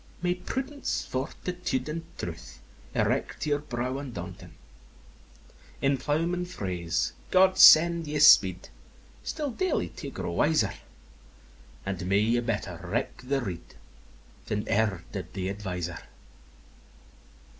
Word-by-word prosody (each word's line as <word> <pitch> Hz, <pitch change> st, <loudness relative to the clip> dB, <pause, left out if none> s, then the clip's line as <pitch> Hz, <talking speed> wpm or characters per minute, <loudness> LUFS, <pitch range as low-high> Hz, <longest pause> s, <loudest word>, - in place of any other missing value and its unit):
May 180 Hz, 0 st, +2 dB
prudence, 265 Hz, +10 st, -3 dB
fortitude, 135 Hz, +1 st, -3 dB
and 160 Hz, +2 st, -3 dB, 0.2 s
truth 65 Hz, -8 st, -7 dB, 0.4 s
Erect -, -, 0 dB
your 145 Hz, -1 st, +1 dB
brow 130 Hz, -1 st, -3 dB
undaunting! 140 Hz, -4 st, -8 dB, 1.2 s
In 135 Hz, 0 st, +2 dB
ploughman 165 Hz, +6 st, 0 dB
phrase, 90 Hz, -, -2 dB, 0.2 s
'God 185 Hz, 0 st, +5 dB
send 170 Hz, 0 st, +8 dB
you 150 Hz, 0 st, -2 dB
speed,' 95 Hz, -, +6 dB, 0.5 s
Still 300 Hz, -3 st, -3 dB
daily 375 Hz, +9 st, -1 dB
to -, -, -8 dB
grow -, -, -5 dB
wiser: 135 Hz, -11 st, +2 dB, 1.1 s
And 95 Hz, -2 st, -3 dB
may 100 Hz, +1 st, +3 dB
you 115 Hz, +3 st, +2 dB
better 115 Hz, -4 st, -3 dB
reck -, -, -3 dB
the 135 Hz, +2 st, -1 dB
rede 90 Hz, -7 st, -7 dB, 0.7 s
Than 105 Hz, 0 st, -2 dB
ever 100 Hz, -5 st, +1 dB
did 95 Hz, -2 st, -7 dB
th' 95 Hz, -1 st, -2 dB
adviser! 90 Hz, -4 st, -4 dB
125 Hz, 115 wpm, -28 LUFS, -, 1.2 s, send